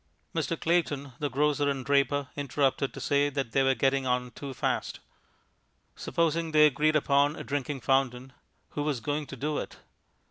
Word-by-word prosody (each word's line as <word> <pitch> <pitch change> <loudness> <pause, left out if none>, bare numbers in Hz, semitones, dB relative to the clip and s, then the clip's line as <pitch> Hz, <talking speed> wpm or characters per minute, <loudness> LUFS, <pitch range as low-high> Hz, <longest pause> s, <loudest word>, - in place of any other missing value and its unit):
Mr. 165 0 -2
Clayton, 145 -5 0
the 145 - -1
grocer 145 +1 +1
and 135 -2 -3
draper, 140 -1 +1
interrupted 140 -1 0
to - - -9
say 145 0 +2
that 135 -4 -3
they 135 - +3
were 135 0 +3
getting 135 0 +1
on 125 0 0
too 140 +3 -7
fast. 130 - -2 1.0
Supposing 165 -1 -1
they 150 0 +7
agreed 150 +2 +2
upon 145 0 +3
a - - -7
drinking 140 -1 -3
fountain, 130 -1 0 0.4
who 145 - -4
was 145 -4 -1
going 145 +5 -3
to - - -7
do 150 +4 -2
it? - - -7
140 Hz, 170 wpm, -28 LUFS, 135-150 Hz, 1.0 s, they